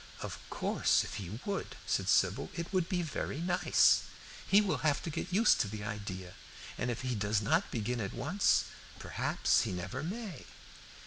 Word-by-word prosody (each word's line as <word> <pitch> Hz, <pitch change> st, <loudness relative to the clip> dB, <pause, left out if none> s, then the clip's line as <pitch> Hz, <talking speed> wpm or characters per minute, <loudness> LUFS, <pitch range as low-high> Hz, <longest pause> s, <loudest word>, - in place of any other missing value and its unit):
"Of -, -, -5 dB
course, -, -, +2 dB
if -, -, -6 dB
he 100 Hz, +3 st, -6 dB
would," 200 Hz, -1 st, -3 dB
said -, -, 0 dB
Sybil, -, -, +3 dB
"it 170 Hz, +2 st, -5 dB
would 185 Hz, -3 st, +1 dB
be 180 Hz, -2 st, 0 dB
very 150 Hz, -1 st, -3 dB
nice. 180 Hz, +1 st, +4 dB, 0.5 s
He 200 Hz, -, +6 dB
will 205 Hz, -3 st, +1 dB
have 150 Hz, -1 st, +1 dB
to 165 Hz, -, -3 dB
get 150 Hz, -, -4 dB
used 215 Hz, +6 st, +5 dB
to -, -, 0 dB
the 105 Hz, 0 st, -6 dB
idea, 100 Hz, -3 st, -5 dB, 0.4 s
and 125 Hz, -, -2 dB
if 120 Hz, -, -2 dB
he 125 Hz, -1 st, -1 dB
does 105 Hz, -1 st, +1 dB
not 160 Hz, -, +1 dB
begin 120 Hz, +1 st, -2 dB
at 100 Hz, -, -3 dB
once, 155 Hz, +11 st, +2 dB, 0.3 s
perhaps -, -, +1 dB
he -, -, -2 dB
never 95 Hz, +9 st, -4 dB
may." 190 Hz, -, -5 dB
135 Hz, 180 wpm, -32 LUFS, -, 0.5 s, He